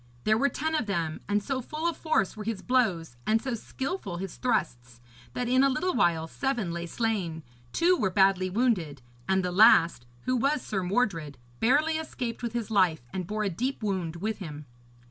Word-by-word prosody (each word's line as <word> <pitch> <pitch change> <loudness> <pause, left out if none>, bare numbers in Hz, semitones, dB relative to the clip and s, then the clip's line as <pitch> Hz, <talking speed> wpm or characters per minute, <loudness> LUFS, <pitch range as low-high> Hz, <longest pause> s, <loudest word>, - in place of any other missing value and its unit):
There 215 - +3
were 275 +6 +2
ten 315 +3 -2
of 300 -8 0
them, 165 -5 -2
and 205 0 +1
so 270 +1 -2
full 310 +6 -3
of 340 - 0
force 310 - 0
were 215 - -6
his 210 -3 -4
blows 190 - +1
and 220 +1 +4
so 260 +1 -3
skilful 260 - -4
his 190 0 -6
thrusts, 125 - -2 0.3
that 245 - -2
in 255 +2 +4
a 275 - +5
little 355 +8 0
while 165 -2 +2
seven 240 - -2
lay 170 0 -4
slain, 185 -7 -2 0.3
two 355 +2 +3
were 215 - 0
badly 190 -1 +3
wounded, 180 - 0 0.3
and 190 -1 +2
the 180 - -1
last, 170 - +5
who 255 - 0
was 275 +3 +1
Sir 195 -3 -2
Mordred, 180 - -1 0.2
barely 305 +7 +3
escaped 250 -7 -5
with 235 -2 -3
his 235 -2 -3
life, 185 - +3
and 185 -2 -3
bore 215 +2 -2
a 205 - +1
deep 250 +7 -3
wound 185 -5 -2
with 210 +5 -3
him. 150 -5 -7
210 Hz, 195 wpm, -28 LUFS, 175-255 Hz, 0.3 s, a